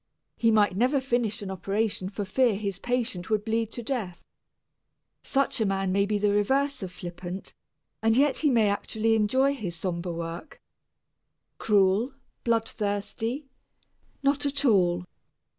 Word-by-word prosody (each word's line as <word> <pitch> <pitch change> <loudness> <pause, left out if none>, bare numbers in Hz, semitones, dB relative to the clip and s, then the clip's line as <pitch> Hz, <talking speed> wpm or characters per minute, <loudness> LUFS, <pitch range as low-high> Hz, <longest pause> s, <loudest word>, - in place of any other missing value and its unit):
He 230 - +2
might 210 -4 +4
never 255 +7 +3
finish 240 -5 -1
an 190 - -5
operation 195 0 -1
for 205 0 -4
fear 235 +3 +2
his 200 -2 -3
patient 240 -7 -2
would 210 -1 +1
bleed 225 0 0
to 240 - -5
death. 220 -9 -4 1.0
Such 270 -3 0
a - - +3
man 195 -1 0
may 200 +1 +2
be 210 0 +1
the 205 0 +2
reverse 270 +8 +1
of 185 -2 -5
flippant, 180 +1 -7 0.5
and 225 +1 +3
yet 280 0 +3
he 305 - +2
may 230 -5 +4
actually 220 +2 0
enjoy 260 +6 +3
his 195 -10 -4
somber 175 0 -3
work. 170 - -6 1.0
Cruel, 205 +4 +3 0.3
bloodthirsty? 225 +3 -1 0.8
Not 280 +1 +2
at 280 0 -1
all. 180 -6 +3
215 Hz, 140 wpm, -27 LUFS, 195-245 Hz, 1.0 s, might